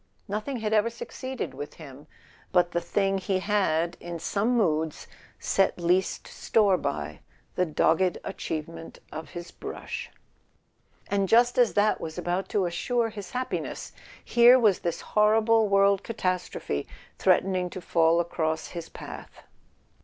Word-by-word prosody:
Nothing 215 +5 -3
had 215 0 -1
ever 215 +1 +3
succeeded 260 +2 -6
with 145 - -7
him 145 -1 -12 0.4
but 175 -1 +3
the 175 - 0
thing 195 0 0
he 190 0 0
had 180 -4 0
in 175 -1 -6
some 215 +8 0
moods 160 -7 0 0.3
set 195 - +1
least 180 +2 +1
store 205 -4 +2
by, 75 - -3 0.3
the 180 - +1
dogged 165 +3 +2
achievement 165 +1 -6
of 160 -1 -7
his 175 0 -7
brush; - - -6 1.0
and 195 -2 0
just 240 +2 +4
as 240 -2 +4
that 210 +1 +2
was 160 0 -6
about 180 +2 -2
to 195 -3 +1
assure 225 +7 0
his 205 -4 -8
happiness, 255 +1 -4 0.3
here 240 +1 +7
was 215 -7 +3
this 170 -1 -3
horrible 220 +1 +3
world 200 0 +4
catastrophe 185 - -2 0.3
threatening 185 -2 +2
to 185 - -7
fall 165 -1 +3
across 160 -2 -1
his 170 -2 -7
path. - - -10
185 Hz, 140 wpm, -27 LUFS, 170-215 Hz, 1.0 s, here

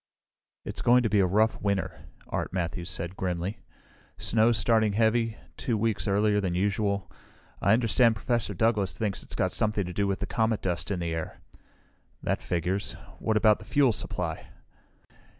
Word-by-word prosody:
"It's - - -5
going 125 +1 +5
to 110 - 0
be 105 - +4
a 95 - +4
rough 110 +4 +2
winter," 100 -2 -2 0.2
Art - - -3
Matthews 85 -1 -3
said, 85 +2 -3
grimly. 90 +2 -3 0.6
"Snow's 115 +1 +2
started 110 -2 +2
heavy, 115 0 +2 0.2
two 115 -3 -1
weeks 110 0 -1
earlier 105 +1 +2
than 90 -3 -1
usual. 100 0 0 0.5
I 100 - +4
understand 115 0 +4
Professor 115 -2 -1
Douglas 105 -1 +1
thinks 105 -4 -2
it's - - -9
got - - 0
something 105 -2 +1
to 90 - -6
do 100 +2 0
with 100 -1 0
the - - -3
comet 110 -1 0
dust 90 0 -1
in 100 - -1
the 85 -1 -2
air." 80 -1 -5 0.8
"That - - -1
figures. 90 +4 -1 0.3
What 110 -1 +1
about 105 0 +4
the 105 - -12
fuel 135 0 +3
supply?" - - -4
105 Hz, 170 wpm, -28 LUFS, 95-110 Hz, 0.8 s, going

